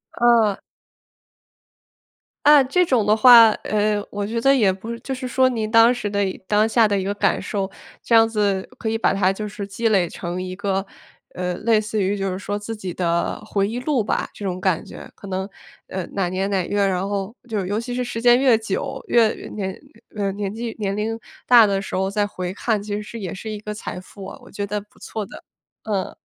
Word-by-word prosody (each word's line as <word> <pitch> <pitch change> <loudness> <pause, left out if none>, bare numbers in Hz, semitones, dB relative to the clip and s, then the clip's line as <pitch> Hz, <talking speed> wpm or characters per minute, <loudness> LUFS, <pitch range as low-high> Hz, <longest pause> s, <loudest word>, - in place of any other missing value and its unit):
啊。 230 -4 +3 1.9
嗯， 290 -3 +7
这 360 +7 +3
种 255 - +2
的 210 +1 +4
话 230 0 +9
呃， 210 -1 0
我 205 0 -3
觉 230 +2 -2
得 275 +3 +5
也 205 -7 +3
不 195 +5 -8
是 235 - -6
就 265 - -4
是 255 0 -5
说 260 +1 +3
您 225 -4 -2
当 230 +2 +6
时 240 -4 -3
的 200 0 -2 0.3
当 210 +1 +3
下 225 0 +4
的 200 -1 0
一 - - -2
个 200 +1 -1
感 205 - +1
受， 195 -2 -3 0.3
这 230 - +2
样 225 0 +7
子 205 -4 0
可 225 - -2
以 225 - 0
把 225 - +2
它 195 -1 +2
就 210 +2 -5
是 205 0 -6
积 225 +3 -1
累 190 -5 +2
成 175 +1 -5
一 185 0 -5
个， 195 -1 -1 0.5
呃， 180 0 -2
类 225 0 +2
似 215 0 -2
于 195 +2 0
就 195 -1 -2
是 185 - -4
说 205 +1 -3
自 210 +2 -6
己 190 -4 -6
的 170 -1 -1
回 200 -1 0
忆 235 +3 -3
录 265 -4 +1
吧， - - -1
这 - - -10
种 185 -2 -2
感 185 -3 0
觉。 - - -11
可 200 - -12
能， 190 0 -3 0.4
呃， 185 -1 -4
哪 190 -3 0
年 190 +2 -2
哪 190 -3 0
月 205 - 0
儿， 200 - +3
然 185 +1 -1
后 200 +2 -3
就 220 -3 -2
是 185 - -3
尤 205 +3 -1
其 245 +2 -5
是 250 +1 -1
时 245 -2 -4
间 240 +1 +5
越 260 -4 +5
久， 225 +5 -3
越 230 -2 +4 0.2
年 190 -3 -4 0.4
呃， 200 -2 -1
年 200 0 -4
纪 230 +1 -5
年 200 -1 -2
龄 225 +2 -2 0.3
大 235 -3 +7
的 195 -1 0
时 195 - -5
候 190 +1 0
再 205 +1 0
回 185 -3 -5
看 220 -2 0
其 205 0 -4
实 230 +2 -8
也 190 -5 -5
是 220 +4 -6
一 210 - -5
个 210 0 -6
财 210 -3 -6
富 195 +1 -12
啊， 195 - -9
我 - - -15
觉 205 0 -4
得 205 +1 -3
不 210 - -23
错 215 - -5
的。 - - -12 0.4
嗯。 200 -4 -3
210 Hz, 245 characters per minute, -22 LUFS, 195-230 Hz, 1.9 s, 话